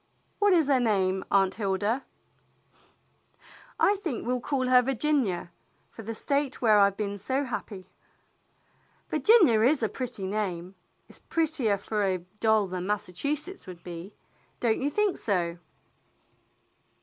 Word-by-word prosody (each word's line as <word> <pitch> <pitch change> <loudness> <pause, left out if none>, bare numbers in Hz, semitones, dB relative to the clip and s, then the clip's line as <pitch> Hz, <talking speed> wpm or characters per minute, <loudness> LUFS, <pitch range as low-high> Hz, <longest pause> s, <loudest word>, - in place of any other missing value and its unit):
What 410 -1 +4
is 325 -5 +3
her 275 -3 +3
name, 190 -5 +1
Aunt 195 -1 +3
Hilda?" 205 +4 -1 1.8
"I 405 +1 +4
think 330 - -4
we'll 250 +1 0
call 260 -1 -1
her 250 0 +6
Virginia, 255 - 0 0.4
for - - -10
the 225 +1 -6
State 280 +2 -1
where 215 -3 +5
I've 200 -1 +4
been 205 -1 -3
so 265 +8 -1
happy." 205 -6 -6 1.2
"Virginia 310 - +5
is 265 +2 +3
a 220 - +1
pretty 245 -4 -5
name. 190 -3 -3 0.3
It's - - -18
prettier 295 -11 0
for 210 +1 -2
a 190 -2 +1 0.2
doll 220 -2 +3
than 185 -1 -5
Massachusetts 240 - -3
would 175 -2 -10
be; 175 +3 -8 0.4
don't 230 -1 +1
you 280 - +1
think 410 +5 0
so.?" 175 -5 -1
220 Hz, 135 wpm, -27 LUFS, 195-275 Hz, 1.8 s, her